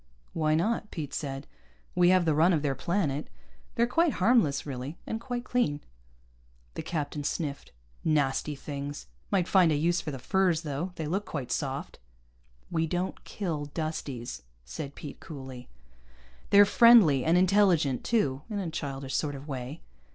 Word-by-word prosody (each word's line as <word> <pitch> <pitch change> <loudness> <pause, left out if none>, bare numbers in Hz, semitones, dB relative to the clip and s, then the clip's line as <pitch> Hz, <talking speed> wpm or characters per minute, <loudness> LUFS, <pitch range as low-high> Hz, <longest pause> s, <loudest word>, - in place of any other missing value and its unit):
"Why 155 -1 +2
not?" 210 +5 0
Pete 150 -5 -6
said. 135 -1 -4 0.5
"We 175 0 +4
have 185 -1 +4
the 160 - +3
run 165 +5 +4
of 155 -3 +1
their 140 -2 +1
planet. 155 -1 -1 0.5
They're 235 -1 +3
quite 330 +5 +2
harmless, 185 - +3
really. 135 +2 -5
And 225 - -4
quite 245 0 -4
clean." 195 -15 +1 0.9
The - - -4
captain 150 -3 -3
sniffed. 145 -1 -3 0.3
"Nasty 150 -1 +1
things. 145 +1 -6 0.2
Might 185 -3 +1
find 180 -4 +5
a - - +2
use 170 +4 +1
for 155 - -5
the 135 - -5
furs, 180 +4 +1
though. 155 +5 -3
They 160 - -4
look 190 +7 -1
quite 140 -9 -5
soft." 135 -2 -3 0.7
"We 165 -1 +1
don't 180 +3 -3
kill 165 -8 -3
Dusties," 140 - -4 0.2
said 135 - -6
Pete 145 - -8
coolly. 130 -4 -9 0.8
"They're 205 0 +8
friendly, 205 - +7
and 165 +2 +3
intelligent 180 -8 +3
too, 145 - +1
in 210 - -3
a 185 -5 -3
childish 135 -3 -4
sort 145 -2 -1
of 140 +2 -9
way." 130 +2 -5
155 Hz, 160 wpm, -28 LUFS, 140-185 Hz, 0.9 s, They're